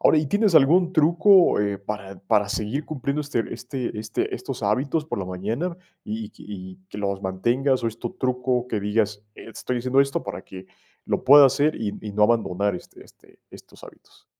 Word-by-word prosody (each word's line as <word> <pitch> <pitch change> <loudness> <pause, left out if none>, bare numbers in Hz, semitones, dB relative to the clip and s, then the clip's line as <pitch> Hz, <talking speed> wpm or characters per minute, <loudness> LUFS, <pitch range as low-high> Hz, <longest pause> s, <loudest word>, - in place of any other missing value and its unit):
Ahora 155 - +5
y, 150 - 0
¿tienes 205 +4 +2
algún 170 +5 +5
truco, 170 - +5
eh, 100 -1 -1
para 100 -1 -7
para 105 0 +1
seguir 110 +9 -2
cumpliendo 140 0 -3
este 140 -6 -3
este 125 -6 -5
este 110 -1 -3
estos - - -6
hábitos 135 +9 0
por 155 - -4
la 95 - -3
mañana? 110 - -3 0.3
Y 110 +1 -4
y - - -15
que - - -17
y 95 -2 -9
que 105 - -8
los 100 -1 -2
mantengas 120 +8 0
o - - +2
es 115 +1 -10
tu - - -4
truco, 125 -4 -1
que 110 -4 -2
digas: 105 0 -1
"Estoy 120 +2 -5
haciendo 130 +3 +2
esto 140 0 0
para - - -6
que 95 0 -11 0.4
lo - - -1
pueda 145 +2 +9
hacer 145 +4 +1
y 105 -2 -3
y 105 -2 -7
no 105 - +1
abandonar 100 -3 +2
este - - -11
este - - -23
estos - - -14
hábitos". - - -18
115 Hz, 195 wpm, -24 LUFS, 105-140 Hz, 0.4 s, pueda